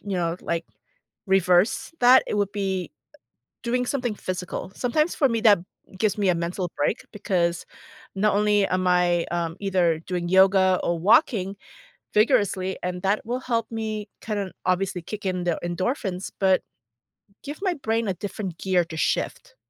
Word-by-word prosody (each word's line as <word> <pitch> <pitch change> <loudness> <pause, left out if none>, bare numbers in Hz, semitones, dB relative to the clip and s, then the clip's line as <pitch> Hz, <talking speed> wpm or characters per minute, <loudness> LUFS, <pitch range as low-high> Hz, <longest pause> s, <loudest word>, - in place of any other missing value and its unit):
you 200 -2 -4
know, 170 0 -1
like, 170 0 -2 0.6
reverse 190 - +2
that, 250 +1 +7
it - - -2
would 200 -1 0
be 190 -3 -2 0.7
doing 250 +1 0
something 245 -5 -2
physical. 185 0 -5
Sometimes 305 +7 0
for 275 -3 +3
me 230 -1 -1
that 205 -5 +6 0.4
gives 210 0 +1
me 200 -3 +2
a 175 - +3
mental 175 +1 -3
break 175 - -1
because 180 -5 -1 0.5
not 205 +1 +2
only 205 -1 +3
am 185 0 0
I, 175 -1 +3
um, 170 -1 -2
either 180 -5 +1
doing 175 0 -4
yoga, 190 0 +5
or 170 -1 0
walking 200 - +3 0.6
vigorously, 205 -5 +2
and 180 0 -3
that 200 +3 0
will 245 +3 -2
help 230 -3 -2
me, 215 -2 -4
kind 210 -2 -3
of, 195 -2 -4
obviously 185 -1 0
kick 210 +4 -7
in 185 -2 -1
the 170 - 0
endorphins, 185 +1 -2
but 190 -1 +3 0.8
give 290 +4 -7
my 375 -3 +1
brain 225 -5 -1
a 190 - 0
different 190 -2 -6
gear 185 -2 +1
to 160 -1 -8
shift. - - -2
195 Hz, 160 wpm, -24 LUFS, 180-220 Hz, 0.8 s, that